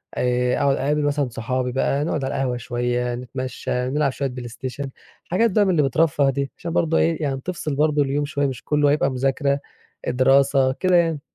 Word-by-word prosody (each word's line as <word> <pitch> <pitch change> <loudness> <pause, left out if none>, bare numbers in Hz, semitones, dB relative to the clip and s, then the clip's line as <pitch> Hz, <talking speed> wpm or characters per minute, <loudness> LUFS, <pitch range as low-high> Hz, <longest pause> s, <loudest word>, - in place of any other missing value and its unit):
آآ 125 0 +1
أقعد 140 -1 +2
أقابل 145 +3 0
مثلًا 145 -2 0
صحابي 125 +2 -2
بقى 135 +2 0
نقعد 150 -3 -2
على 135 - -3
القهوة 125 -2 -1
شوية، 120 0 -2
نتمشى، 125 +1 -5 0.2
نلعب 145 0 +1
شوية 135 0 -2
بلايستيشن، 125 +2 -6 0.4
حاجات 225 +6 +2
بقى 205 +2 +3
من 190 - +2
اللي 160 -4 +3
بترفه 140 0 +2
دي 140 +1 -2
عشان 170 -1 -5
برضه 165 -1 +2
إيه 165 0 +1
يعني 135 -2 -2
تفصل 165 -4 -4
برضه 150 0 +2
اليوم 145 +1 0
شوية 145 -1 -1
مش 130 -1 -6
كلّه 150 -1 +2
هيبقى 145 -2 +2
مذاكرة، 135 +2 0 0.5
دراسة 135 +1 +3
كده 185 +4 +1
يعني. 165 -3 +2
140 Hz, 185 wpm, -22 LUFS, 130-150 Hz, 0.5 s, بقى